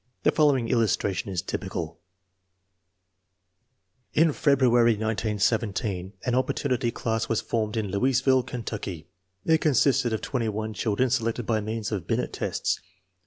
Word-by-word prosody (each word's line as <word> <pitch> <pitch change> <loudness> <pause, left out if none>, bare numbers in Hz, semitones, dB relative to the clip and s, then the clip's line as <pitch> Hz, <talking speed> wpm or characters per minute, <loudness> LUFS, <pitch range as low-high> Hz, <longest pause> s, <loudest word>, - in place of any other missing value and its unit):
The - - +4
following 140 -6 +3
illustration 105 -5 0
is 90 -2 -2
typical: 85 -4 -4 2.2
In 160 -1 +4
February, 125 -6 +4
1917, 105 -3 -1
an 125 - 0
opportunity 130 -1 0
class 115 -1 -2
was 115 - +1
formed 110 -1 -2
in 105 -3 -1
Louisville, 130 +5 +3
Kentucky. 105 -10 -6 0.4
It 160 -1 +4
consisted 135 -3 +3
of 110 - -1
21 110 -4 -2
children 115 +4 0
selected 115 -1 0
by 110 -1 +1
means 110 +1 -4
of 95 -6 -3
Binet - - -1
tests. - - -1
115 Hz, 120 wpm, -26 LUFS, 105-125 Hz, 2.2 s, The